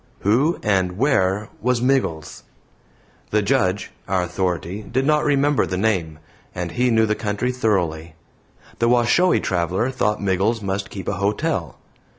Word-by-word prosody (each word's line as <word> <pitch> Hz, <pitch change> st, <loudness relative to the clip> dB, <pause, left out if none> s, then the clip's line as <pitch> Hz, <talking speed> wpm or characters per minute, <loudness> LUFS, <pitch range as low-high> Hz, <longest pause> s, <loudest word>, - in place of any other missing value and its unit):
Who 130 Hz, -, +2 dB
and 95 Hz, -3 st, +1 dB
where 105 Hz, -6 st, +1 dB
was 125 Hz, +1 st, +1 dB
Miggles? 125 Hz, -, -1 dB, 0.9 s
The 105 Hz, 0 st, +1 dB
Judge, 100 Hz, -4 st, 0 dB, 0.2 s
our 95 Hz, -1 st, +1 dB
authority, 90 Hz, +1 st, -2 dB
did 120 Hz, +6 st, -2 dB
not 150 Hz, 0 st, +3 dB
remember 145 Hz, 0 st, +2 dB
the 90 Hz, -, -3 dB
name, 90 Hz, -7 st, 0 dB, 0.4 s
and 90 Hz, -1 st, -3 dB
he 125 Hz, +7 st, +1 dB
knew 110 Hz, -1 st, +3 dB
the 110 Hz, -, +1 dB
country 110 Hz, +3 st, -2 dB
thoroughly. 85 Hz, -10 st, -1 dB, 0.6 s
The 115 Hz, -, +2 dB
Washoe 125 Hz, +10 st, +3 dB
traveler 90 Hz, +7 st, -1 dB
thought 105 Hz, -5 st, 0 dB
Miggles 100 Hz, +4 st, 0 dB
must 95 Hz, -1 st, -3 dB
keep 95 Hz, -3 st, -8 dB
a -, -, -1 dB
hotel. 105 Hz, -, -1 dB
105 Hz, 145 wpm, -21 LUFS, 90-125 Hz, 0.9 s, not